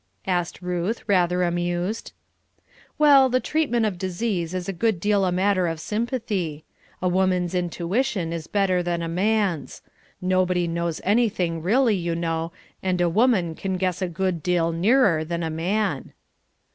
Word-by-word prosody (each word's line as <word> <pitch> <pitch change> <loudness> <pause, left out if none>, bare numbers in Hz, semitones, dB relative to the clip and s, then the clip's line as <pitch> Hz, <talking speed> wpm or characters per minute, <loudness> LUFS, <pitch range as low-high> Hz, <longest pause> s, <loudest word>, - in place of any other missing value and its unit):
asked 180 -1 -2
Ruth, 180 +5 -2
rather 180 -3 +2
amused. 175 +4 -2 0.9
"Well, 280 -3 +6
the 255 +1 +2
treatment 255 -7 0
of 195 -5 -2
disease 185 -2 -2
is 180 0 -3
a 195 - -2
good 215 0 0
deal 205 +1 +2
a 180 - +1
matter 185 0 +2
of 165 -1 -3
sympathy. 210 - -3 0.4
A - - +2
woman's 180 -1 +1
intuition 180 +1 -1
is 165 -2 -5
better 195 -3 +1
than 170 -1 -2
a - - -2
man's. 195 -1 -1 0.4
Nobody 185 -1 +1
knows 170 -1 -2
anything, 190 -6 +1
really, 225 +5 +3
you 170 -2 -2
know, 165 0 -2 0.3
and 185 -1 0
a 175 -1 +3
woman 200 -4 +2
can 190 +3 -3
guess 185 0 -1
a 185 - 0
good 175 -1 -2
deal 170 -1 +1
nearer 185 -1 +3
than 170 +1 -3
a 160 - -2
man." 195 +7 -1
180 Hz, 155 wpm, -24 LUFS, 170-205 Hz, 0.9 s, Well